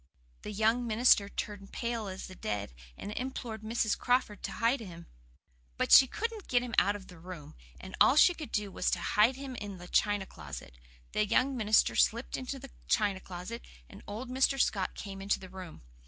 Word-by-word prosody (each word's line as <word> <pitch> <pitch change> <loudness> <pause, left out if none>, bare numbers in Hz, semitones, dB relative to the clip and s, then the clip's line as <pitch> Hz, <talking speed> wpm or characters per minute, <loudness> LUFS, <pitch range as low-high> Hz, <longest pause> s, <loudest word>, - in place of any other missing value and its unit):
The - - -6
young 225 +4 +1
minister 215 -2 +4
turned 200 -1 -6
pale 235 -3 -3
as 190 0 -6
the 185 - -10
dead, 105 - -4 0.2
and 205 - -6
implored 240 -2 -5
Mrs. 220 -1 0
Crawford 245 -5 0
to - - -4
hid 235 +4 +1
him. 170 -6 -9 0.7
But - - -1
she 265 - +10
couldn't 445 - -4
get 245 -1 +2
him 245 -2 -6
out 205 +1 +2
of 200 -2 -9
the 180 -3 -14
room, 170 -4 -9 0.3
and 190 - -9
all 265 - +7
she 355 +4 +7
could 310 -4 -8
do 210 -2 -1
was - - 0
to - - 0
hide 215 +5 +3
him 270 -1 -7
in 205 -3 -6
the 175 0 -10
china 205 +1 +1
closet. 65 - -10 0.3
The - - +1
young 260 +5 +2
minister 215 -2 +3
slipped 235 +3 +2
into 260 +1 -4
the 270 0 -11 0.2
china 205 -3 +2
closet, 185 +6 -7 0.3
and - - -13
old 220 +5 -5
Mr. 265 +1 +2
Scott 195 -6 +1
came 195 -1 -7
into 200 +1 0
the 190 - -10
room. 185 - -10
210 Hz, 200 wpm, -31 LUFS, 190-245 Hz, 0.7 s, she